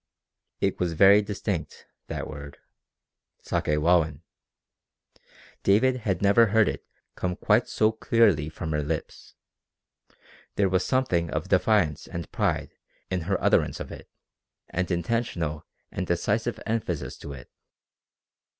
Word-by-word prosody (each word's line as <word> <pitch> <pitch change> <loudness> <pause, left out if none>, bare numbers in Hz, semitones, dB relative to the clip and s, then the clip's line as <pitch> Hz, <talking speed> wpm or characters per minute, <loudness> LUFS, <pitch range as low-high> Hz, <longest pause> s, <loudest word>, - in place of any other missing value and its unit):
It 100 - 0
was 90 -2 0
very 100 +5 +7
distinct, 100 -6 -4 0.2
that - - -4
word 70 -2 -9 0.9
Sakewawin! 75 0 +1 1.4
David 125 +6 +3
had 100 -6 -2
never 105 +4 +5
heard 110 0 +4
it - - -3 0.3
come 90 -1 -2
quite 105 +4 +2
so 110 0 +2
clearly 110 -9 +2
from 80 +1 -5
her 75 -1 0
lips. 75 +2 -5 1.2
There 100 -2 +2
was 95 0 +1
something 90 -11 +1
of - - -3
defiance 75 -1 +2
and 85 -1 -6
pride - - -1 0.4
in 90 -1 0
her 100 - +1
utterance - - +2
of - - -7
it - - -11 0.6
and 90 +1 -2
intentional 85 -4 -2 0.2
and - - -4
decisive - - 0
emphasis 110 -8 -2
to 70 - -8
it. 65 -3 -12
90 Hz, 125 wpm, -26 LUFS, 80-105 Hz, 1.4 s, very